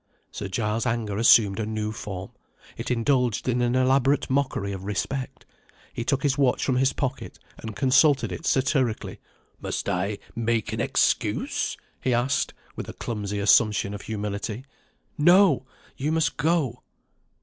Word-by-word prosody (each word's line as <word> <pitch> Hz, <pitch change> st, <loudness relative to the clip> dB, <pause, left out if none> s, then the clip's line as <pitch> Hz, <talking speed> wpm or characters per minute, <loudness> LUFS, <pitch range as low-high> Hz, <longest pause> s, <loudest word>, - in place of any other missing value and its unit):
Sir 100 Hz, -, -5 dB
Giles's 105 Hz, +4 st, -1 dB
anger 115 Hz, -4 st, -2 dB
assumed 105 Hz, -3 st, +5 dB
a 110 Hz, -, -1 dB
new 110 Hz, -1 st, -2 dB
form, 95 Hz, -3 st, -7 dB, 0.4 s
it -, -, -5 dB
indulged 125 Hz, -2 st, +1 dB
in 125 Hz, -1 st, +1 dB
an 120 Hz, +1 st, +1 dB
elaborate 135 Hz, +2 st, +2 dB
mockery 130 Hz, -7 st, 0 dB
of 95 Hz, -1 st, -6 dB
respect. 125 Hz, +7 st, -4 dB, 0.5 s
He 120 Hz, -, -3 dB
took 135 Hz, +2 st, 0 dB
his 140 Hz, -1 st, +1 dB
watch 130 Hz, -3 st, +2 dB
from 130 Hz, -2 st, +1 dB
his 135 Hz, +1 st, +3 dB
pocket, 130 Hz, -2 st, -4 dB, 0.2 s
and 110 Hz, -2 st, -7 dB
consulted 135 Hz, -, +3 dB
it 85 Hz, -, -5 dB
satirically. 130 Hz, -3 st, 0 dB, 0.4 s
"Must -, -, -3 dB
I 95 Hz, +3 st, -1 dB, 0.2 s
make 115 Hz, -2 st, -1 dB
an -, -, -2 dB
excuse?" -, -, 0 dB, 0.3 s
he 125 Hz, -2 st, +2 dB
asked 125 Hz, +3 st, 0 dB, 0.2 s
with -, -, -6 dB
a -, -, -6 dB
clumsy 105 Hz, -3 st, -4 dB
assumption 100 Hz, 0 st, +3 dB
of 105 Hz, -, -6 dB
humility. 105 Hz, +3 st, -4 dB, 0.5 s
"No! 175 Hz, -4 st, +5 dB, 0.3 s
you 145 Hz, +3 st, -2 dB
must 160 Hz, -4 st, +1 dB
go." 145 Hz, -5 st, 0 dB
120 Hz, 150 wpm, -25 LUFS, 105-135 Hz, 0.5 s, assumed